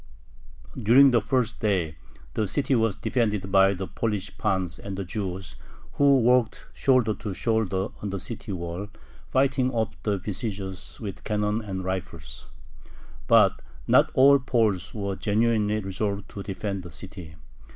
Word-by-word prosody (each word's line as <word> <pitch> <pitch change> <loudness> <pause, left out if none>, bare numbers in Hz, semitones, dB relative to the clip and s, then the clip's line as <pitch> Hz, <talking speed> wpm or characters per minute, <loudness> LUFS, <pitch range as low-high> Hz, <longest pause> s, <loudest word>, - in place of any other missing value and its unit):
During 130 +6 +7
the 120 -2 +3
first 125 -4 0
day 90 -7 0 0.4
the 110 -2 0
city 135 +6 0
was 115 -5 +2
defended 105 -5 -1
by 95 0 +5
the 95 +1 -4
Polish 105 -1 -3
pans 95 -4 -1
and 100 -1 -6
the 100 - -3
Jews, 95 - -5 0.3
who 140 -1 +4
worked 125 -1 +2
shoulder 130 -5 +3
to 105 -2 -6
shoulder 105 -3 0
on 105 - -3
the 100 0 -3
city 110 +1 -7
wall, 85 +2 -4 0.4
fighting 130 -1 +2
off 110 -3 -2
the 105 -2 0
besiegers 95 -2 -5
with 100 -5 -7
cannon 105 +1 0
and 95 -3 -5
rifles. 90 -3 -5 0.8
But - - +5 0.2
not - - +5
all 140 +1 +7
Poles 110 -8 0
were 100 -2 -2
genuinely 110 0 +1
resolved 100 +1 -3
to 100 - -7
defend 100 0 -4
the 90 - -10
city. 80 +2 -10
105 Hz, 145 wpm, -26 LUFS, 95-115 Hz, 0.8 s, During